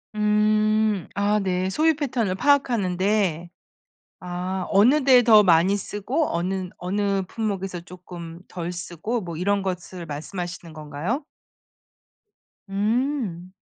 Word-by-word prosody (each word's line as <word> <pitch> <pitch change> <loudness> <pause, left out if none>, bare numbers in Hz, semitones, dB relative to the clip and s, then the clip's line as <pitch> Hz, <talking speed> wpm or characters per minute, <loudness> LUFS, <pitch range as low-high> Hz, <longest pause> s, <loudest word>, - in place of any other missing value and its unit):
음 215 -1 +2
아 205 +1 +2
네. 185 -1 -1
소비 315 +10 +3
패턴을 245 -10 -1
파악하는 235 -9 +2
데. 185 -4 0 0.7
아 180 +1 -3
어느 255 +9 +4
데에 255 -3 +7
더 215 -3 +7
많이 180 +2 +4
쓰고 220 - -2
어는 185 +1 -2
어느 195 +1 -1
품목에서 195 -5 -3
쪼금 175 -1 -10
덜 175 0 -5
쓰고 180 +6 -4
뭐 170 -3 -6
이런 200 +2 +1
것을 180 -1 -5
말씀하시는 170 +2 -6
건가요? 155 - -4 1.5
음. 210 - -1
195 Hz, 220 characters per minute, -24 LUFS, 180-215 Hz, 1.5 s, 데에